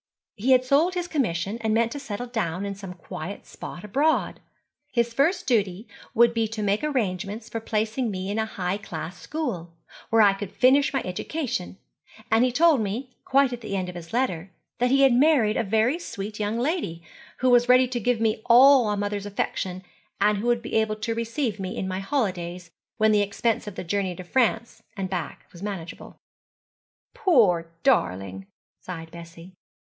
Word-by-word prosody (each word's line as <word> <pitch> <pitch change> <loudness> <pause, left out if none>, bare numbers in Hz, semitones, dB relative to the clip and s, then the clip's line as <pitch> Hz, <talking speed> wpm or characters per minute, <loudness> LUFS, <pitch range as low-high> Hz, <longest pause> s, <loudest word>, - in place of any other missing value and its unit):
He 250 +6 +3
had 255 0 +4
sold 310 +8 +3
his 355 -1 -2
commission 220 - -1
and 220 -1 +1
meant 230 0 +2
to 285 - -5
settle 245 -3 -5
down 200 -6 -2
in 200 - -3
some 195 -2 -9
quiet 175 +2 -7
spot 175 - -9
abroad. 280 +10 +1 0.5
His 235 -2 0
first 325 +9 +1
duty 210 -4 0 0.3
would 235 +1 +5
be 225 -1 +1
to 215 -1 -4
make 205 +4 +1
arrangements 215 -5 -2
for 230 - -3
placing 220 +2 -1
me 190 -2 -4
in 215 - -1
a 220 - 0
high 190 -1 -3
class 175 -2 -7
school, 175 - -4 0.3
where 225 -1 +5
I 200 -1 +6
could 195 -1 -6
finish 275 +6 +4
my 270 - -1
education; 225 - -4 0.5
and 225 +2 +5
he 255 - +2
told 310 0 +4
me, 225 +6 -3
quite 275 -1 +3
at 240 - -6
the 215 -3 -4
end 185 -1 -2
of - - -7
his 170 -1 -9
letter, 195 -8 -1 0.3
that 245 +1 +2
he 275 +2 +4
had 270 -2 +6
married 250 -5 +4
a - - +1
very 225 - +1
sweet 210 - -6
young 210 +2 -1
lady, 245 - -2 0.3
who 255 0 +2
was 245 0 +4
ready 255 0 +6
to 245 -1 -2
give 245 +1 +1
me 220 -1 0
all 255 -1 +7
a 205 - 0
mother's 205 0 -3
affection, 185 -2 -3 0.4
and 205 0 +3
who 230 - -3
would 240 -1 +1
be - - -7
able 220 -1 +1
to 215 +2 -3
receive 230 -1 -2
me 185 -1 -4
in 190 - -2
my 185 0 -3
holidays, 180 -7 -3 0.3
when 220 0 +4
the 210 -1 +4
expense 210 +2 -1
of 205 - -6
the - - -5
journey 185 0 -1
to 185 - -8
France 230 +3 0 0.2
and 190 -1 -3
back 180 -3 -4
was 170 - -13
manageable.' 195 -5 -7 1.0
'Poor 230 - +3
darling!' 95 - +1 0.3
sighed 165 -3 -8
Bessie. 170 +1 -12
215 Hz, 190 wpm, -25 LUFS, 190-250 Hz, 1.0 s, all